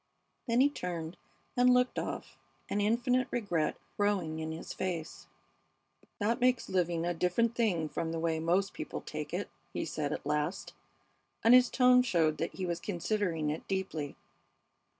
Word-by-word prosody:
Then 235 +1 +3
he 280 - +6
turned 170 - -4 0.4
and 250 0 +5
looked 250 0 +3
off, - - -5 0.3
an 205 - 0
infinite 245 +4 +2
regret 175 -9 0 0.2
growing 190 -6 0
in 160 0 -3
his 160 - -6
face. 170 -4 -4 0.9
"That 225 +4 0
makes 250 -1 +2
living 175 -2 +1
a 175 - 0
different 180 +7 +1
thing 200 -10 +1
from 160 +1 -3
the 165 - -2
way 165 -1 0
most 180 +5 +1
people - - -5
take - - -6
it," - - -2 0.3
he - - -2
said, - - -2
at - - -4
last, - - -1 0.7
and 230 - +7
his 250 -1 +7
tone 250 -1 +6
showed 165 -10 +1
that 165 - -2
he 190 - -3
was 170 -1 -2
considering 175 -4 -1
it 155 - -6
deeply. 180 -7 -3
185 Hz, 160 wpm, -31 LUFS, 165-235 Hz, 0.9 s, and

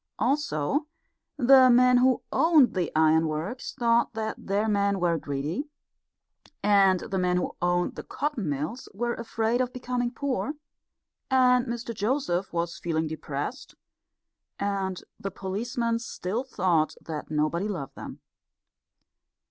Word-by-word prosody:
Also, 285 - 0 0.5
the 260 -1 +7
men 250 +1 +6
who 255 0 +3
owned 315 -6 +5
the 180 -3 -1
ironworks 160 - +1
thought 235 -2 +2
that 220 -1 -4
their 205 +3 +1
men 200 -2 +1
were 175 -1 +2
greedy; 150 - -3 0.9
and 195 -3 +4
the 190 - -3
men 180 0 +1
who 180 - -2
owned 175 0 +1
the - - -7
cotton 270 - -3
mills 150 - -4
were 240 +3 -1
afraid 230 +1 -1
of 250 -1 -1
becoming 250 -1 -2
poor; 275 +3 -2 0.8
and 250 -1 +4
Mr 235 0 -4
Joseph 205 -4 -1
was 170 0 -2
feeling 160 -2 -1
depressed; 155 - -5 0.8
and 195 -2 -2 0.2
the 195 - -3
policemen 230 +5 -2
still 225 0 -3
thought 180 -11 +1
that 155 -2 -6
nobody 155 +5 0
loved 170 -11 -5
them. - - -9
205 Hz, 125 wpm, -27 LUFS, 175-250 Hz, 0.9 s, the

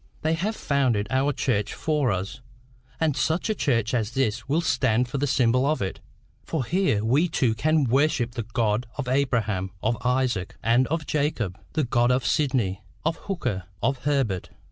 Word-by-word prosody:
They 160 +1 +2
have 195 +7 -1
founded 130 - +1
our 135 +2 +2
Church 105 -7 -1
for 150 -6 +1
us, 95 +1 -4 0.6
and 155 -4 +1
such 170 +7 0
a - - +2
church 120 - 0
as 110 -4 +1
this 120 -2 -1
will 155 +4 +3
stand 125 -6 +2
for 135 +3 -3
the 145 - +1
symbol 125 -1 +3
of 150 +3 +1
it; 95 - -3 0.4
for 155 -6 -2
here 175 - +1
we 140 +10 +3
too 125 -8 +1
can 155 +7 +2
worship 135 0 +2
the 120 - -4
God 115 0 0
of 145 -3 -3
Abraham, 115 -8 0
of 110 +1 0
Isaac, 125 -6 0
and 120 +3 +3
of 160 0 -2
Jacob 130 - -1
the 155 - +1
God 120 -1 +2
of 125 0 +1
Sidney, 125 - +1 0.2
of 165 +1 +1
Hooker, 125 - -3 0.2
of 135 -1 +1
Herbert. 135 -11 0
130 Hz, 175 wpm, -25 LUFS, 115-145 Hz, 0.6 s, will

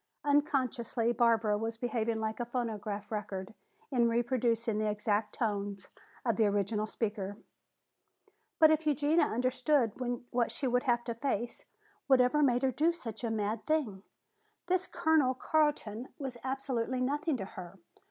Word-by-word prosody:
Unconsciously 265 -5 +1
Barbara 225 -3 +3
was 225 +1 -3
behaving 230 -1 -1
like 220 +1 -3
a 240 - -1
phonograph 220 -4 -4
record 200 -2 -4 0.4
in 240 -3 +3
reproducing 235 -2 +1
the 215 0 +1
exact 210 0 -1
tones 200 -4 -2 0.4
of 230 -4 +1
the 220 - +4
original 205 +1 0
speaker. 205 -3 -3 1.2
"But 315 -1 +7
if 315 0 +1
Eugenia 300 +3 +3
understood 255 +1 +1 0.4
what 240 -1 +1
she 280 - -4
would 250 +1 +1
have 240 -2 +2
to 235 - -3
face, 235 -1 -3 0.4
whatever 265 +2 +4
made 250 -2 +3
her 265 - +3
do 310 +7 +2
such 240 -10 -7
a 230 - 0
mad 215 0 -2
thing? 275 -12 0 0.6
This 370 0 +1
Colonel 320 -6 +2
Carton 265 -6 0
was 270 -5 -5
absolutely 260 -2 -2
nothing 285 +3 0
to 195 - -4
her. 185 -1 -10
235 Hz, 145 wpm, -32 LUFS, 215-270 Hz, 1.2 s, But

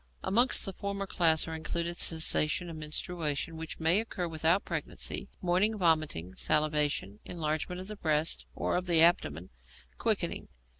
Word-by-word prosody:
Amongst 235 +7 +2
the 195 - -4
former 200 +1 -4
class 165 -4 +3
are 160 - -5
included 170 +2 -2
Cessation 165 +1 +1
of - - -8
menstruation 155 0 -3
(which 160 0 -7
may 165 +4 +4
occur 190 -5 -3
without 165 +3 +2
pregnancy); - - -3
morning 185 +5 +2
vomiting; 155 - +1
salivation; 150 -7 0
enlargement 160 +2 -3
of - - -7
the 210 - -6
breasts 155 -4 0
and - - -1
of 180 0 -3
the 165 -2 +6
abdomen; 90 - +2 0.5
quickening. - - -1
165 Hz, 145 wpm, -30 LUFS, 155-180 Hz, 0.5 s, the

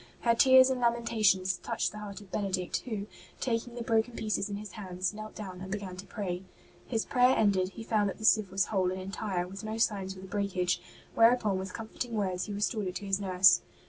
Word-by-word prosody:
Her 235 - +4
tears 260 +2 +7
and 255 -1 -2
lamentations 215 -6 +2
touched - - -2
the 210 - -8
heart 210 -1 -7
of 195 -3 -16
Benedict, 185 -3 -1
who, 215 -5 -3 0.3
taking 235 -1 -2
the 240 - -4
broken 230 +1 +1
pieces 215 -1 -1
in 200 - -3
his 205 -1 -7
hands, 185 -1 -3
knelt 215 0 -8
down 185 -3 -7
and 190 0 -7
began 200 -3 -4
to 190 - -9
pray. 185 -4 -4 0.5
His 225 -3 -1
prayer 250 0 +4
ended, 190 -3 +2
he 225 - -8
found 210 -3 +1
that - - -6
the 220 - -5
sieve 215 -3 +4
was 195 0 +1
whole 185 -2 +2
and 185 - -4
entire, 190 -1 -3
with 195 +3 -8
no 215 +1 -4
sign 205 -4 +1
of 190 0 -6
the 185 - -10
breakage, 190 -2 -1 0.3
whereupon 225 -4 +4
with 190 0 -6
comforting 230 +1 -5
words 190 -4 -1
he 210 - -7
restored 205 0 -1
it 180 - -5
to 205 - -5
his 195 0 +1
nurse. 185 -2 +5
205 Hz, 220 wpm, -30 LUFS, 190-225 Hz, 0.5 s, tears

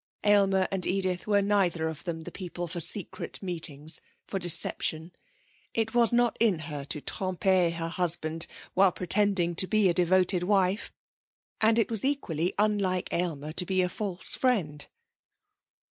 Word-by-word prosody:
Aylmer 195 -2 +3
and 190 -2 0
Edith 185 -1 -1
were 205 -1 +2
neither 185 -5 +1
of 160 +1 -6
them 165 -2 -4
the - - -8
people 175 -2 -6
for 170 +1 -5
secret 195 +4 0
meetings, 160 -4 +1 0.2
for 195 - -4
deception. 165 -1 0 0.6
It 225 0 -1
was 235 -2 +5
not 240 -1 +2
in 220 -6 +3
her 150 -2 -6
to 150 +1 -4
tromper 185 +2 0
her 165 0 -4
husband 165 -2 -1 0.3
while 190 0 +4
pretending 185 -1 0
to 185 +2 +1
be 215 -2 +3
a - - +2
devoted 180 +1 +3
wife, 195 +1 0 0.7
and 220 +1 +4
it 230 0 +1
was 220 -3 +5
equally 185 - -1
unlike 200 -3 0
Aylmer 155 -4 -2
to 180 - +1
be 185 0 0
a 180 - -1
false 190 -2 0
friend. 180 - 0
185 Hz, 155 wpm, -27 LUFS, 170-200 Hz, 0.7 s, was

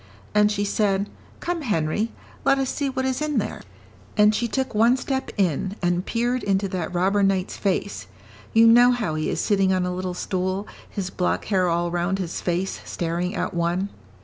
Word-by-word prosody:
"And 210 0 +4
she 205 0 0
said, 200 -1 0 0.3
'Come, 345 -1 -2
Henry, 210 - 0 0.3
let 275 - +4
us 270 -1 0
see 285 -1 -1
what 260 0 -2
is 260 +2 -1
in 305 -1 0
there.' - - -2 0.6
And 210 0 +6
she 235 +2 0
took 265 +2 -2
one 230 +4 +4
step 265 0 -2
in, 190 +1 0
and 175 0 +1
peered 240 +2 0
into 195 0 +1
that 180 -3 -3
robber 190 +3 +2
knight's 195 -1 +1
face; 195 - -2 0.4
you 225 +1 +6
know 240 +2 +7
how 220 -10 -1
he 155 0 -1
is - - -1
sitting 195 -2 +2
on 185 -1 +1
a 180 - -2
little 180 0 -3
stool, 185 +2 -2 0.2
his 190 -2 -4
black 180 -1 -1
hair 185 -3 +2
all 170 0 0
round 175 +2 0
his 180 -3 -4
face, 180 +2 -1
staring 175 +3 -2
at 200 - -2
one." 175 +3 0
195 Hz, 190 wpm, -24 LUFS, 180-230 Hz, 0.6 s, know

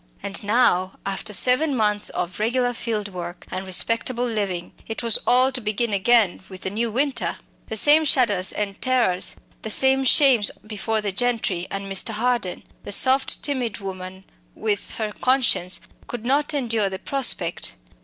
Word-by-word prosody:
And 195 - -6
now, 200 -4 +2
after 195 +2 -3
seven 255 +8 +4
months 210 -2 +1
of 175 +3 -5
regular 245 +3 0
field 220 -3 -3
work 175 0 -8
and 190 +1 -5
respectable 230 +6 +2
living, 200 -7 -3
it 225 +1 -5
was 230 -2 +3
all 255 +2 +5
to 255 -1 -3
begin 215 +1 -1
again 210 -1 +2
with 185 -1 -11
the 190 - -4
new 230 +3 -2
winter! 270 +4 -2 0.3
The 220 - -3
same 300 +7 +6
shudders 230 -10 +3
and 205 -1 -4
terrors, 245 -9 +1 0.3
the 220 - -6
same 265 +4 +5
shames 260 -5 +5 0.2
before 215 +1 -2
the 205 -1 -2
gentry 205 -5 -2
and 195 0 -5
Mr. 195 +3 0
Harden! 235 -5 -2 0.2
the - - -8
soft, 260 +5 +3
timid 255 -7 -2
woman 190 -1 -8 0.3
with 210 -2 -2
her 215 -2 -3
conscience 240 -7 +1 0.3
could 235 -2 -7
not 285 +4 +1
endure 230 -7 0
the 190 - -6
prospect. 195 -8 -1
220 Hz, 160 wpm, -22 LUFS, 195-250 Hz, 0.3 s, same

